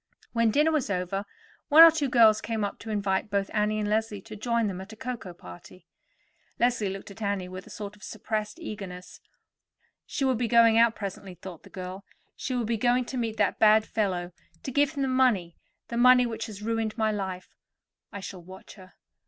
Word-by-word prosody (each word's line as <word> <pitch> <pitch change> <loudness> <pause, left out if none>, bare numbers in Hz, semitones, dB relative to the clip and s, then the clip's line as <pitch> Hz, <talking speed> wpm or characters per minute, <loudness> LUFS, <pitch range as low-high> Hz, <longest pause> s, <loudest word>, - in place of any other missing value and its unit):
When 230 -1 +3
dinner 300 +7 +3
was 305 -8 0
over, 195 +1 -2 0.4
one 310 +2 +10
or 330 - +10
two 300 -4 -1
girls 220 -3 +5
came 225 -2 -2
up 200 - -4
to 225 - -9
invite 200 -1 -1
both 200 -1 -1
Annie 210 0 +1
and 210 -1 -1
Leslie 215 0 -1
to 215 +1 -10
join 235 +2 0
them 190 -2 -3
at 190 +3 -10
a - - -10
cocoa 235 -5 -6
party. 90 - -13 0.7
Leslie 235 -4 +1
looked 195 +1 -7
at 220 - -13
Annie 200 -3 -2
with 185 +1 -9
a - - -13
sort 205 -1 -7
of 205 - -23
suppressed 215 +4 -4
eagerness. 195 - -8 0.9
"She 275 - -2
will 260 - +3
be 240 0 -1
going 230 -1 +5
out 230 0 +4
presently," 195 -2 -7
thought 175 -1 -10
the - - -16
girl. 185 +1 -7 0.3
"She 255 - -4
will 240 -2 -1
be 230 +1 -1
going 245 +3 +2
to 260 - -7
meet 225 -2 -2
that 205 -2 +1
bad 215 0 +5
fellow, 185 -6 -2 0.3
to 265 - -4
give 285 +2 +2
him 280 -2 -2
the - - 0
money—the 235 -4 -1
money 250 +1 +6
which 230 -1 -4
has 210 -2 -9
ruined 225 0 -2
my 220 -1 +1
life. 190 -3 -5 0.6
I 200 - -7
shall 190 -1 -8
watch 185 +2 -13
her. 185 -2 -16
215 Hz, 205 wpm, -27 LUFS, 195-235 Hz, 0.9 s, one